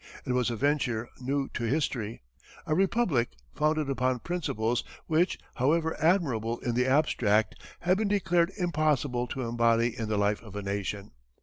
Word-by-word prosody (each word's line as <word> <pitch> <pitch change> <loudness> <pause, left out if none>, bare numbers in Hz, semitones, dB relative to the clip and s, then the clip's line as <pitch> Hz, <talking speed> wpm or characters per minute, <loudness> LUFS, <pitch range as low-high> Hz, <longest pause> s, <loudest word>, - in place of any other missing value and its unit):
It 125 - -1
was 125 -1 +2
a 120 - -2
venture 125 -3 0
new 135 +2 -1
to 120 - -4
history; 115 - -1 0.4
a 160 - 0
Republic 185 - +2 0.2
founded 155 -1 +1
upon 130 -2 +1
principles 120 -7 -1 0.2
which, 165 +3 +2 0.2
however 160 +5 +2
admirable 135 - +2
in 120 - -1
the 125 +2 +2
abstract, 120 -7 +2 0.3
had 185 +2 +2
been 215 - +1
declared 185 -3 +2
impossible 150 - +1
to 130 - -4
embody 115 0 +2
in 115 -3 -4
the 105 - 0
life 105 +1 +1
of 110 -3 -12
a 105 - -4
nation. 100 0 -3
130 Hz, 160 wpm, -28 LUFS, 115-155 Hz, 0.4 s, was